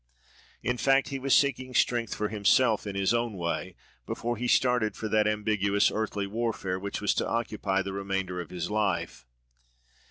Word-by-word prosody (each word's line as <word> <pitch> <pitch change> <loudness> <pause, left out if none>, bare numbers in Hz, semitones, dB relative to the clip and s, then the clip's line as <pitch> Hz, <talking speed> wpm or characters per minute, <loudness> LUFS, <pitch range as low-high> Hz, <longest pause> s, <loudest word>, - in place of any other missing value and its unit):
In 125 0 0
fact, 135 +2 +3
he 135 - -4
was 135 0 +3
seeking 130 -2 +1
strength 120 -2 +1
for 105 -1 -2
himself, 110 +1 +3
in 100 - -4
his 100 +2 +2
own 120 -1 0
way, 85 -1 -3 0.3
before 120 +1 -2
he 120 +2 -3
started 125 -4 +2
for 110 - -4
that 105 0 +2
ambiguous 105 -1 +2
earthly 105 -2 -2
warfare 100 -3 -2
which 100 +2 -4
was 105 - +2
to - - -1
occupy 105 -4 -1
the 95 0 -5
remainder 95 -2 -2
of 85 - -9
his 90 +1 -4
life. 100 - -1
105 Hz, 170 wpm, -28 LUFS, 100-120 Hz, 0.3 s, fact